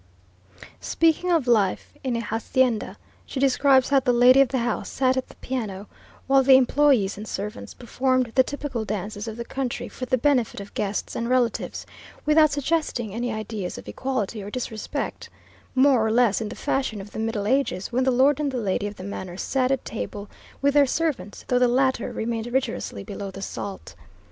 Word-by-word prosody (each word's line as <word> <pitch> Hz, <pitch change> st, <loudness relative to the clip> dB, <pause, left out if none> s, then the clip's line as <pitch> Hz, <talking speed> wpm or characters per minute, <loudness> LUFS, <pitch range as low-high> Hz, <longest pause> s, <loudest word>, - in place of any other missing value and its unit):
Speaking 330 Hz, +2 st, +1 dB
of 325 Hz, -6 st, +2 dB
life 215 Hz, -6 st, +1 dB
in 255 Hz, -3 st, -1 dB
a 230 Hz, -, -1 dB
hacienda, 230 Hz, +1 st, 0 dB, 0.3 s
she 270 Hz, -, -6 dB
describes 270 Hz, -1 st, +4 dB
how 280 Hz, -1 st, +5 dB
the 255 Hz, -1 st, +1 dB
lady 250 Hz, +2 st, +6 dB
of 275 Hz, -, +5 dB
the 260 Hz, +2 st, -2 dB
house 240 Hz, -2 st, -2 dB
sat 260 Hz, -1 st, +1 dB
at 260 Hz, -, -2 dB
the -, -, -16 dB
piano, 210 Hz, -7 st, -4 dB, 0.4 s
while 270 Hz, 0 st, +5 dB
the 265 Hz, 0 st, +7 dB
employees 260 Hz, -6 st, +3 dB
and 215 Hz, -, -7 dB
servants 210 Hz, +3 st, -6 dB
performed 255 Hz, 0 st, 0 dB
the 260 Hz, -, +6 dB
typical 270 Hz, -3 st, -3 dB
dances 210 Hz, +1 st, -4 dB
of 220 Hz, 0 st, -6 dB
the 235 Hz, -, -5 dB
country 265 Hz, -1 st, -3 dB
for 255 Hz, -, -7 dB
the 255 Hz, -, +2 dB
benefit 255 Hz, -4 st, +1 dB
of 200 Hz, 0 st, -9 dB
guests 205 Hz, 0 st, -3 dB
and 235 Hz, +1 st, -2 dB
relatives, 250 Hz, -3 st, 0 dB, 0.4 s
without 305 Hz, 0 st, +5 dB
suggesting 285 Hz, -6 st, -1 dB
any 240 Hz, +2 st, -2 dB
idea 215 Hz, -3 st, -4 dB
of -, -, -9 dB
equality 245 Hz, -5 st, -3 dB
or 200 Hz, -, -7 dB
disrespect, 220 Hz, -2 st, -4 dB, 0.5 s
more 260 Hz, -3 st, +5 dB
or 220 Hz, -, +1 dB
less 225 Hz, -2 st, +3 dB
in 215 Hz, -, -3 dB
the -, -, -7 dB
fashion 260 Hz, -6 st, -1 dB
of 200 Hz, +1 st, -9 dB
the -, -, -6 dB
Middle 220 Hz, -2 st, -2 dB
Ages, 235 Hz, -6 st, 0 dB
when 255 Hz, +2 st, +1 dB
the 260 Hz, -, +3 dB
lord 260 Hz, +3 st, +3 dB
and 295 Hz, -2 st, 0 dB
the 260 Hz, -, -3 dB
lady 205 Hz, -2 st, -1 dB
of 205 Hz, -, -7 dB
the 185 Hz, -, -9 dB
manor 185 Hz, -2 st, -6 dB
sat 255 Hz, +4 st, 0 dB
at 270 Hz, -1 st, -1 dB
table 205 Hz, -2 st, -5 dB, 0.4 s
with 280 Hz, 0 st, +4 dB
their 290 Hz, -1 st, +5 dB
servants, 260 Hz, -, -2 dB
though 250 Hz, -, +2 dB
the 250 Hz, -, +5 dB
latter 260 Hz, 0 st, +1 dB
remained 225 Hz, 0 st, -3 dB
rigorously 240 Hz, -, -2 dB
below 200 Hz, -, -6 dB
the 195 Hz, +1 st, -8 dB
salt. 200 Hz, -1 st, -6 dB
245 Hz, 195 wpm, -24 LUFS, 210-265 Hz, 0.5 s, the